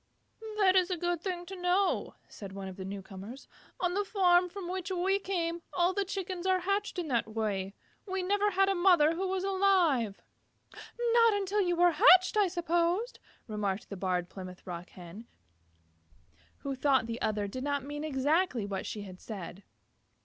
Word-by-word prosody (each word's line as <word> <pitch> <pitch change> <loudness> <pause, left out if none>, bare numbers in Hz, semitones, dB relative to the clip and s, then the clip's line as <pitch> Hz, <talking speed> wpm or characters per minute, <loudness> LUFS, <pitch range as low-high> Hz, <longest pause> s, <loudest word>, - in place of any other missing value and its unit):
"That 385 -3 +4
is 365 -1 +4
a 365 - -1
good 350 0 -1
thing 355 -2 -4
to 385 +2 -8
know," 360 +2 0
said 195 -2 -10
one 195 -1 -6
of 190 - -8
the 190 - -7
new 195 +1 -6
comers. 200 +7 -10 0.3
"On 355 -1 0
the 405 +2 +1
farm 360 -3 +3
from 380 0 -7
which 365 0 -4
we 380 +2 +1
came, 345 -3 -2
all 355 +1 +2
the 400 - 0
Chickens 375 -2 -4
are 370 -1 +2
hatched 400 +2 -1
in 350 -3 -2
that 235 -4 +1
way. 205 -3 -3 0.3
We 380 -1 -2
never 410 +2 +2
had 390 0 +2
a 390 - +2
mother 350 -4 +4
who 375 +3 -2
was 375 0 -2
alive." 370 - +2 0.5
"Not 470 -1 +2
until 400 +1 -1
after 385 - +2
you 350 - +1
were 350 +1 +5
hatched 365 +5 +6
I 415 -2 +4
suppose," 345 +6 0 0.3
remarked 210 -2 -3
the - - -4
Barred 180 -2 -1
Plymouth 185 -1 -10
Rock 175 -1 -7
Hen, 185 +6 -11 1.3
who 275 - -3
thought 265 -2 +2
the 230 +1 -5
other 210 -1 0
did 255 +6 -6
not 285 -2 -1
mean 295 +1 -5
exactly 290 - +1
what 195 -1 -4
she 210 - -5
had 185 -2 -11
said. 195 -3 -8
345 Hz, 185 wpm, -30 LUFS, -, 1.3 s, hatched